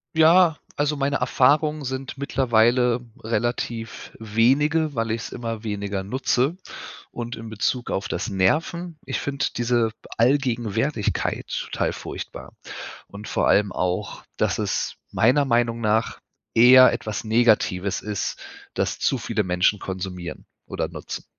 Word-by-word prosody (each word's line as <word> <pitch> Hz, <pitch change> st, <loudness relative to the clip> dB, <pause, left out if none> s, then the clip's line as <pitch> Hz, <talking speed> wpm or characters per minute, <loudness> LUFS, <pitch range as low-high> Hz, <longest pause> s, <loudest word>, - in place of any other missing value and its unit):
Ja, 160 Hz, 0 st, +6 dB, 0.2 s
also 150 Hz, +1 st, 0 dB
meine 140 Hz, 0 st, 0 dB
Erfahrungen 150 Hz, +4 st, +2 dB
sind 130 Hz, 0 st, -5 dB
mittlerweile 125 Hz, -2 st, +2 dB, 0.2 s
relativ 115 Hz, 0 st, -3 dB
wenige, 140 Hz, +8 st, +2 dB
weil 115 Hz, -1 st, -1 dB
ich 115 Hz, 0 st, -2 dB
es -, -, -6 dB
immer 115 Hz, -2 st, -5 dB
weniger 100 Hz, -2 st, -3 dB
nutze 130 Hz, -, 0 dB, 0.5 s
und 120 Hz, 0 st, -5 dB
in 115 Hz, 0 st, -9 dB
Bezug 120 Hz, +3 st, -2 dB
auf 100 Hz, +1 st, -2 dB
das -, -, -3 dB
Nerven, 160 Hz, -, 0 dB
ich 135 Hz, -, -2 dB
finde 140 Hz, 0 st, -2 dB
diese 120 Hz, -1 st, +1 dB, 0.3 s
Allgegenwärtigkeit 120 Hz, -2 st, 0 dB
total -, -, -2 dB
furchtbar -, -, -8 dB, 0.5 s
und 100 Hz, +1 st, -10 dB
vor -, -, 0 dB
allem 100 Hz, -1 st, +3 dB
auch, 90 Hz, 0 st, -2 dB
dass -, -, +1 dB
es -, -, -2 dB, 0.2 s
meiner 130 Hz, +6 st, +3 dB
Meinung 120 Hz, -2 st, +1 dB
nach 110 Hz, 0 st, 0 dB, 0.4 s
eher 130 Hz, +2 st, +8 dB
etwas 110 Hz, 0 st, -4 dB
Negatives 110 Hz, -4 st, +2 dB
ist, 105 Hz, -1 st, -3 dB, 0.3 s
dass -, -, -1 dB
zu -, -, +1 dB
viele 105 Hz, -, -1 dB
Menschen 90 Hz, +3 st, +2 dB
konsumieren 95 Hz, -2 st, -6 dB, 0.2 s
oder -, -, -3 dB
nutzen. -, -, -7 dB
120 Hz, 130 wpm, -23 LUFS, 105-135 Hz, 0.5 s, eher